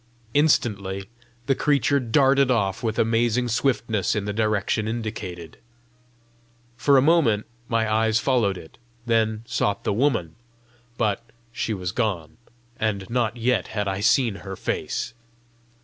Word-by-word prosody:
Instantly 100 Hz, -10 st, +1 dB, 0.4 s
the 135 Hz, -, +3 dB
creature 140 Hz, 0 st, +2 dB
darted 135 Hz, +2 st, +3 dB
off 100 Hz, -6 st, +1 dB
with 110 Hz, -1 st, -2 dB
amazing 115 Hz, +2 st, +2 dB
swiftness 115 Hz, -5 st, 0 dB
in 105 Hz, -2 st, -1 dB
the 105 Hz, -, -2 dB
direction 110 Hz, 0 st, 0 dB
indicated. 105 Hz, -7 st, -5 dB, 1.2 s
For 140 Hz, +3 st, +4 dB
a 130 Hz, -, +5 dB
moment 140 Hz, -10 st, +3 dB, 0.2 s
my 115 Hz, -2 st, +1 dB
eyes 110 Hz, 0 st, +2 dB
followed 115 Hz, -6 st, +1 dB
it, 80 Hz, -, -13 dB, 0.3 s
then 110 Hz, -2 st, +1 dB
sought 110 Hz, -4 st, -1 dB
the -, -, 0 dB
woman; 110 Hz, -, 0 dB, 0.6 s
but 110 Hz, -1 st, 0 dB, 0.3 s
she 115 Hz, -2 st, -2 dB
was 90 Hz, -2 st, -3 dB
gone, 95 Hz, -8 st, -2 dB, 0.4 s
and 100 Hz, -4 st, -1 dB
not 120 Hz, -1 st, 0 dB
yet 120 Hz, -4 st, +1 dB
had 105 Hz, -1 st, 0 dB
I 95 Hz, 0 st, -2 dB
seen 115 Hz, 0 st, +2 dB
her 95 Hz, -1 st, -7 dB
face! -, -, -3 dB
110 Hz, 135 wpm, -24 LUFS, 100-125 Hz, 1.2 s, a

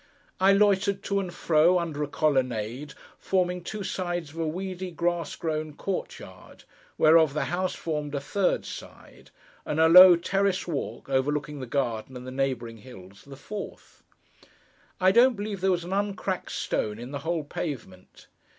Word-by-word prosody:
I 190 Hz, +1 st, +5 dB
loitered 200 Hz, -1 st, +2 dB
to 200 Hz, 0 st, 0 dB
and 185 Hz, -3 st, -4 dB
fro, 170 Hz, +2 st, +3 dB
under 165 Hz, -4 st, -3 dB
a 150 Hz, -, -1 dB
colonnade, 130 Hz, -3 st, -1 dB, 0.2 s
forming 180 Hz, -2 st, 0 dB
two 210 Hz, +3 st, -5 dB
sides 175 Hz, -5 st, -3 dB
of 165 Hz, -, -10 dB
a 165 Hz, -, 0 dB
weedy, 185 Hz, +2 st, -4 dB
grass 175 Hz, 0 st, -2 dB
grown 155 Hz, -2 st, -3 dB
court 195 Hz, +3 st, -4 dB
yard, -, -, -14 dB, 0.3 s
whereof 155 Hz, -2 st, +5 dB
the 150 Hz, -, 0 dB
house 185 Hz, +1 st, -1 dB
formed 150 Hz, -3 st, -4 dB
a -, -, 0 dB
third 185 Hz, +7 st, 0 dB
side, -, -, -11 dB, 0.3 s
and 150 Hz, -, -3 dB
a 160 Hz, -, +6 dB
low 180 Hz, +2 st, +10 dB
terrace 195 Hz, +2 st, 0 dB
walk, 155 Hz, -5 st, -4 dB
overlooking 145 Hz, +2 st, -1 dB
the 130 Hz, -, -6 dB
garden 125 Hz, -1 st, -2 dB
and 125 Hz, -, -10 dB
the 130 Hz, -, -7 dB
neighbouring 130 Hz, -4 st, -2 dB
hills, 100 Hz, -5 st, -14 dB
the 140 Hz, -, -10 dB
fourth. 205 Hz, +8 st, -9 dB, 1.0 s
I 185 Hz, 0 st, +5 dB
don't 245 Hz, +4 st, +5 dB
believe 205 Hz, -2 st, -5 dB
there 190 Hz, -, +2 dB
was 175 Hz, -2 st, +1 dB
an 180 Hz, +2 st, -5 dB
uncracked 200 Hz, -2 st, -2 dB
stone 105 Hz, 0 st, -2 dB
in 120 Hz, +3 st, -8 dB
the 140 Hz, -, -4 dB
whole 165 Hz, 0 st, -2 dB
pavement. 125 Hz, -, -7 dB
165 Hz, 165 wpm, -26 LUFS, 140-185 Hz, 1.0 s, low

